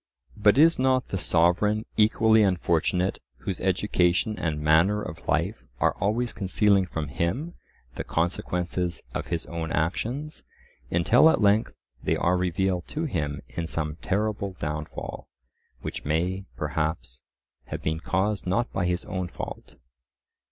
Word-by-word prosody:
But 105 +2 +4
is 165 +1 +6
not 130 -1 +2
the 95 - -2
sovereign 90 +7 +2
equally 110 0 +4
unfortunate 90 -1 +1 0.2
whose 95 - -4
education 95 +2 +2
and 80 -3 -1
manner 80 +7 +4
of 80 -6 -7
life - - 0 0.2
are - - +3
always 115 +5 0
concealing 100 -1 +2
from 80 -4 -4
him 95 - -2 0.4
the - - -2
consequences 90 +1 -1
of - - -3
his 85 - -2
own 80 -2 -4
actions, 120 - -2 0.5
until 115 - +5
at - - +2
length 105 +1 +2 0.2
they - - +1
are 90 +2 +2
revealed 90 0 0
to 155 - -3
him 75 - -2
in 85 0 -4
some 75 -1 -3
terrible 100 +1 -1
downfall, 75 -2 -5 0.6
which - - -5
may, 90 +6 -1
perhaps, 65 -6 -2 0.4
have - - -6
been 80 +1 -1
caused 95 +3 -1
not 115 +7 0
by 90 -2 0
his 90 0 -1
own 95 -1 -3
fault? - - -8
90 Hz, 135 wpm, -26 LUFS, 85-105 Hz, 0.6 s, is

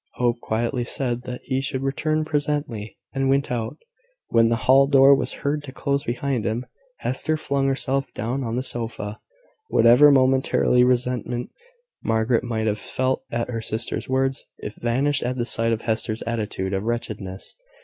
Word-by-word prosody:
Hope 120 -1 +1
quietly 120 +3 -1
said 125 0 -2
that 125 -1 -6
he 130 -1 -1
should 135 -1 -2
return 155 +3 0
presently, 145 -8 -2 0.2
and 135 -1 0
went 140 0 +1
out. 115 -2 -3 0.5
When 115 0 +4
the 115 - +2
hall 135 +1 +6
door 140 0 +7
was 135 - +1
heard 145 +1 0
to 130 - -8
close 140 +1 -1
behind 125 -1 -1
him, 115 +3 -2 0.4
Hester 155 +4 -1
flung 140 -2 0
herself 135 0 -1
down 120 +5 -3
on 115 -1 -2
the 125 - -1
sofa. 115 -4 -3 0.5
Whatever 125 +6 +7
momentary 130 -2 +3
resentment 125 -1 0 0.5
Margaret 115 +1 +1
might 115 -2 -2
have 105 -1 0
felt 130 0 -1
at 115 +1 -2
her 115 -1 -3
sister's 110 +3 -2
words, 135 0 0
it 105 - -7
vanished 130 +4 +1
at 125 +1 -2
the 120 - -1
sight 115 -1 +1
of 115 -1 -1
Hester's 110 0 -1
attitude 105 -4 -3
of 95 - 0
wretchedness. 105 -5 -4
125 Hz, 165 wpm, -23 LUFS, 115-135 Hz, 0.5 s, door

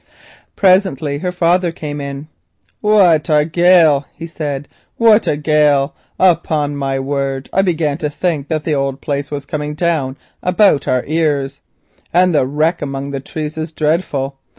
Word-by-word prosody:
Presently 185 -7 +2
her 180 +2 -2
father 180 0 +1
came 150 -3 -6
in. 140 +1 -6 0.5
"What 185 -7 +3
a 150 -1 +3
gale," 165 -3 +4
he 165 - -7
said, 145 -4 -5 0.3
"what 225 -1 +4
a 145 - +1
gale! 150 -2 +2 0.2
Upon 160 -5 +1
my 135 -1 -2
word 135 0 -3
I 195 - +3
began 160 -5 -1
to 150 - -2
think 150 -2 -2
that 155 -1 -2
the 155 - -1
old 135 -1 -1
place 140 0 -3
was 145 -1 -5
coming 150 0 -4
down 150 -6 -1 0.2
about 180 -4 +2
our 130 -1 +1
ears, 145 -3 -1 0.5
and 180 +1 +3
the 140 -4 +2
wreck 155 +5 0
among 140 -1 -4
the 135 - -3
trees 155 +3 -6
is 155 0 -4
dreadful. 150 -4 -1
150 Hz, 155 wpm, -16 LUFS, 140-170 Hz, 0.5 s, gale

